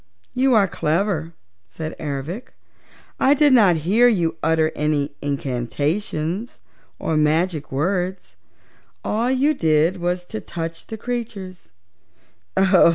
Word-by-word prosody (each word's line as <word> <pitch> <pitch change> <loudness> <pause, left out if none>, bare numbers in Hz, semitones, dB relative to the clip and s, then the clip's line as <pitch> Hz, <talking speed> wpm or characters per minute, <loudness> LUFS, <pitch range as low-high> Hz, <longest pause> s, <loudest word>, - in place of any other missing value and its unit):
"You 255 0 +3
are 200 -3 +5
clever," 165 0 -1 0.3
said 155 - -6
Ervic. 155 - -5 0.7
"I 280 +2 +5
did 290 -1 +5
not 205 -8 +6
hear 225 +7 +5
you 175 -9 +1
utter 160 0 +2
any 150 -1 0
incantations 150 - -2 0.4
or 160 - -1
magic 155 +1 +1
words. 180 +6 -2 0.7
All 230 +4 0
you 265 +4 +3
did 160 - +2
was 175 0 -2
to 220 +4 -6
touch 165 -1 -6
the 220 - -6
creatures." 210 - -5
175 Hz, 110 wpm, -22 LUFS, 155-215 Hz, 0.7 s, not